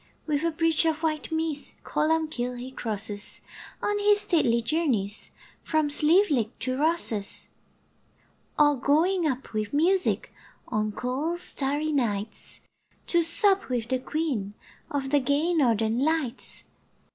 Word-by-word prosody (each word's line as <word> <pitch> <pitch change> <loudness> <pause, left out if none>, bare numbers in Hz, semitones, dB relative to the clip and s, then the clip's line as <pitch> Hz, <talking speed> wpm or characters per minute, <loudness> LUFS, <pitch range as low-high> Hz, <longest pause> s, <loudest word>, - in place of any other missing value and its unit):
With 295 -2 0
a 335 - +2
bridge 330 0 +1
of 320 0 0
white 310 0 -1
mist 320 -2 -2
Columbkill 305 -6 -1
he 255 +2 -7
crosses, 210 -4 -5 0.4
On 415 0 +1
his 410 0 +4
stately 255 - +2
journeys 235 -7 -1 0.3
From 310 -2 +1
Slieveleague 300 - +3
to 255 0 0
Rosses; 280 -9 -1 1.1
Or 295 -1 +5
going 330 +6 +2
up 260 -4 -4
with 215 +1 -2
music 360 +6 +1 0.4
On 215 0 0
cold 270 +10 -2
starry 295 -1 -1
nights 220 -7 -2 0.4
To 345 - +3
sup 385 - +3
with 240 -2 -2
the 260 -1 +1
Queen 255 -9 -2 0.3
Of 275 -2 -3
the 290 - +5
gay 285 +6 +1
Northern 230 -6 +2
Lights. 290 -4 -1
290 Hz, 125 wpm, -26 LUFS, 240-320 Hz, 1.1 s, Or